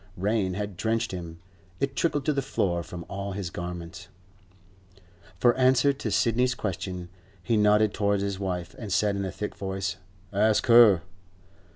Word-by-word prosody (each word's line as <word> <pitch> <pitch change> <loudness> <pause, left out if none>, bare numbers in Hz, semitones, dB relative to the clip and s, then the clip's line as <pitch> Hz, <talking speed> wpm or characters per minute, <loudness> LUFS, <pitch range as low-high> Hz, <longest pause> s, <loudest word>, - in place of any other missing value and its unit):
Rain 95 -1 0
had 100 -2 -4
drenched 115 +3 0
him; 85 -3 -7 0.4
it 135 0 -1
trickled 145 -5 0
to 150 - +2
the 140 - 0
floor 90 -10 -1
from 85 0 -8
all 100 0 -5
his 95 -3 -4
garments. 90 +1 -7 1.3
For 120 +6 +4
answer 130 +2 +4
to 140 +1 -4
Sidney's 125 +2 +2
question, 90 -4 -4 0.3
he 115 - +1
nodded 105 0 +4
towards 100 -1 +1
his 100 -1 -3
wife, 90 -3 -3
and 110 -5 -6
said 105 +1 +2
in 100 0 -2
a 95 - -3
thick 105 - -5
voice, 95 0 -3 0.4
'Ask 105 +2 +3
her. 115 -8 +7
100 Hz, 160 wpm, -27 LUFS, 90-115 Hz, 1.3 s, her